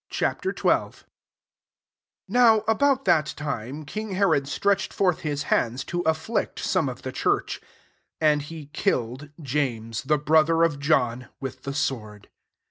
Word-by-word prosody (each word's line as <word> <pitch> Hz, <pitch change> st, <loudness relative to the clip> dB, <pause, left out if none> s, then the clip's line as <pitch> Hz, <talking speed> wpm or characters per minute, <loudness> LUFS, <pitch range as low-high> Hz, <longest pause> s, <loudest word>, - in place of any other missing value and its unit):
XII. -, -, +1 dB, 0.3 s
1 -, -, +3 dB, 1.4 s
NOW 230 Hz, -3 st, +5 dB
about 270 Hz, +4 st, +2 dB
that 155 Hz, -4 st, +2 dB
time, 140 Hz, 0 st, -4 dB
king 210 Hz, +6 st, -5 dB
Herod 165 Hz, -8 st, +2 dB
stretched 200 Hz, +7 st, 0 dB
forth 180 Hz, -4 st, +1 dB
fiU 145 Hz, -2 st, -2 dB
hands 120 Hz, +4 st, 0 dB
to 175 Hz, 0 st, -3 dB
afflict 160 Hz, +8 st, -1 dB
some 170 Hz, -8 st, 0 dB
of 125 Hz, -, -9 dB
the 130 Hz, -, -4 dB
church. -, -, 0 dB, 0.6 s
2 160 Hz, -, 0 dB
And 150 Hz, -1 st, +4 dB
he 155 Hz, +1 st, -8 dB
killed 130 Hz, -, -1 dB
James, 120 Hz, -6 st, -2 dB
the 150 Hz, +3 st, +1 dB
brother 160 Hz, +2 st, +3 dB
of 155 Hz, -4 st, +1 dB
John, 125 Hz, -4 st, +1 dB
with 130 Hz, -1 st, -6 dB
the 135 Hz, -, -5 dB
sword. 110 Hz, -8 st, -3 dB
150 Hz, 140 wpm, -25 LUFS, 130-175 Hz, 1.4 s, NOW